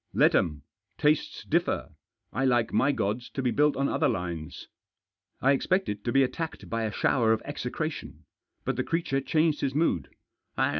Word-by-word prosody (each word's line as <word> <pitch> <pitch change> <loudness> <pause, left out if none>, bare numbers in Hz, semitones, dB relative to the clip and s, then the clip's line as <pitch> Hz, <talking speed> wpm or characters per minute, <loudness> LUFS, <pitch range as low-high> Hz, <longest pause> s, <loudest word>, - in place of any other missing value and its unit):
" - - -43
Let - - +6
'em. 75 -3 +1 0.3
Tastes 150 0 +1
differ. - - 0 0.4
I 135 - 0
like 120 -3 +2
my 140 - +4
gods 115 0 -2
to 135 - -1
be 125 - +2
built 150 +1 +3
on 140 +1 +1
other - - +1
lines." 85 -4 -4 0.7
I 135 - +4
expected 140 - 0
to 120 - +1
be 135 +1 +5
attacked 160 +5 -4
by 115 -1 0
a 110 - -2
shower 110 +1 +2
of 110 - -2
execra - - -3
tion. - - -10 0.4
But - - -1
the - - +1
creature 165 -5 0
changed 155 +1 +1
his 135 -1 -1
mood. 150 - +1
130 Hz, 180 wpm, -28 LUFS, 110-150 Hz, 0.7 s, Let